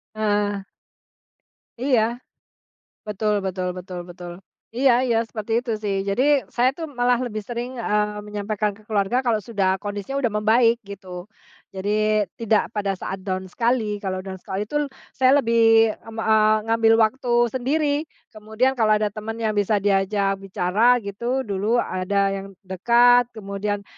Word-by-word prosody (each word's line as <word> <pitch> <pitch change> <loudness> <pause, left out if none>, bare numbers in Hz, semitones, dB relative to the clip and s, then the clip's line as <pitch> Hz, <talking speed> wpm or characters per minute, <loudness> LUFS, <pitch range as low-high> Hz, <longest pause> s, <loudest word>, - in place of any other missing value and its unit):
Heeh. 205 -2 0 1.2
Iya, 255 -4 +3 1.1
betul 210 0 -1
betul 185 -1 -2
betul 180 0 -7
betul, 175 0 -9 0.4
iya 260 0 +4
iya 230 -2 +2
seperti 220 -1 -5
itu 245 -2 -6
sih 200 -2 -1
jadi 200 +6 +1 0.3
saya 245 +1 +3
itu 330 - -10 0.2
malah 245 0 +3
lebih 215 -2 -5
sering, 245 +2 -5
eee, 210 -2 -1
menyampaikan 210 0 -2
ke - - -18
keluarga 215 +3 +1
kalau 235 -4 0
sudah 195 -4 0
kondisinya 205 +5 -5
udah 225 - +1
membaik 230 +3 +3
gitu, 185 -1 -9 0.5
jadi 210 +2 +1 0.2
tidak 225 -1 +1
pada 200 -2 -1
saat 190 0 -5
down 185 -1 -2
sekali. 230 -4 0
Kalau 185 -2 -4
down 190 -1 -7
sekali 195 +2 -4
itu 260 +8 -5 0.4
saya 260 +2 +4
lebih 225 -1 +4
m 225 0 -12
eee, 215 -1 +3
ngambil 225 0 +3
waktu 245 +2 -2 0.2
sendiri 290 +3 0 0.2
kemudian 220 +5 0
kalau 220 -4 +3
ada 210 -1 -1
teman 220 +1 -6
yang 220 -2 -1
bisa 205 +1 +2
diajak 195 0 +1
bicara 195 +5 +2
gitu 235 +6 -2
dulu 205 +4 0
ada 195 -2 0
yang 195 0 -5 0.2
dekat 240 +6 +4
kemudian, 200 0 -4
215 Hz, 145 wpm, -23 LUFS, 200-235 Hz, 1.2 s, iya